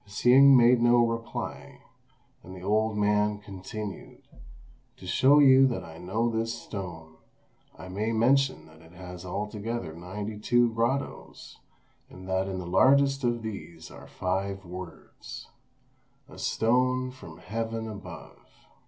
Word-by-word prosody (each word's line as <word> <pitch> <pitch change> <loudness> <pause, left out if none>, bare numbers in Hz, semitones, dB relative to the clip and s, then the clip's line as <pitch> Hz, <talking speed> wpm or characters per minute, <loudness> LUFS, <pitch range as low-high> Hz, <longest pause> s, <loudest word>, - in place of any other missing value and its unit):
Hsing 130 +6 +6
made 120 0 +5
no 120 0 +5
reply; 115 0 -5 0.6
and 95 +2 -11
the 90 - -11
old 110 +2 +1
man 105 0 +2
continued, 100 +1 -8 0.7
"To - - -13
show 130 +10 +4
you 135 -2 +7
that 125 - -3
I 80 -1 -11
know 110 +6 -1
this 115 0 -2
stone, 80 -7 -8 0.6
I - - -10
may 105 +4 -2
mention 130 +4 +2
that 80 0 -18
it 80 +1 -18
has 90 -1 -10
altogether 105 -1 -4
ninety 100 +5 -7
two 120 +1 +2
grottoes, 120 +5 -3 0.5
and 95 0 -12
that 95 0 0
in 95 -1 -4
the 90 - -5
largest 135 +9 +3
of 120 -1 0
these 85 -7 -8
are - - -12
five 95 +1 -3
words: 90 -1 -10 0.8
'A - - -13
stone 125 +2 +1
from 130 - -12
Heaven 115 0 -4
above. 95 -6 -10
105 Hz, 135 wpm, -27 LUFS, 95-120 Hz, 0.8 s, you